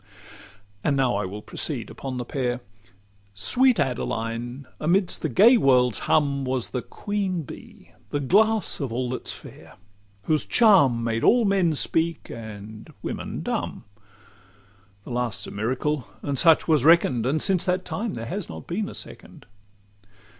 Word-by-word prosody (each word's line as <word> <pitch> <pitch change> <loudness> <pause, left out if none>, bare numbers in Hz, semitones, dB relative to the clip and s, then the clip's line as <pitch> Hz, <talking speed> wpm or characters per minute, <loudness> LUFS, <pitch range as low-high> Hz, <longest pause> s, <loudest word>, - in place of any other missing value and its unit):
And 140 -2 +1
now 130 -2 +2
I - - -1
will 105 +3 -7
proceed - - -3
upon 130 -2 -6
the 125 - -4
pair. 125 -2 -2 0.7
Sweet 250 - +2
Adeline, 120 0 -3
amidst 175 +4 +1
the 160 - -1
gay 225 - +6
world's 125 - +3
hum, 140 -2 +1
Was 130 -2 -2
the 125 - -3
Queen 195 - -3
Bee, 130 - -13 0.2
the 145 - -1
glass 215 +9 +3
of 135 -6 -3
all 125 +1 -2
that's 130 - -3
fair; - - -12 0.5
Whose 155 -5 +1
charms 135 - +4
made 115 0 -1
all 240 -1 +5
men 190 -5 +2
speak, 165 +3 0
and 110 -1 -9
women - - -5
dumb. - - -3 1.2
The - - -10
last's 120 -3 -2
a - - -8
miracle, 125 +6 -2 0.2
and 140 - -2
such 160 +3 +5
was 155 -6 +3
reckon'd, 140 -7 +4
And 150 +4 +1
since 190 -1 +1
that 185 0 0
time 220 0 -3
there 115 - -5
has 190 - -5
not - - -8
been 200 +4 -3
a - - -9
second. - - -10
140 Hz, 155 wpm, -24 LUFS, 120-180 Hz, 1.2 s, gay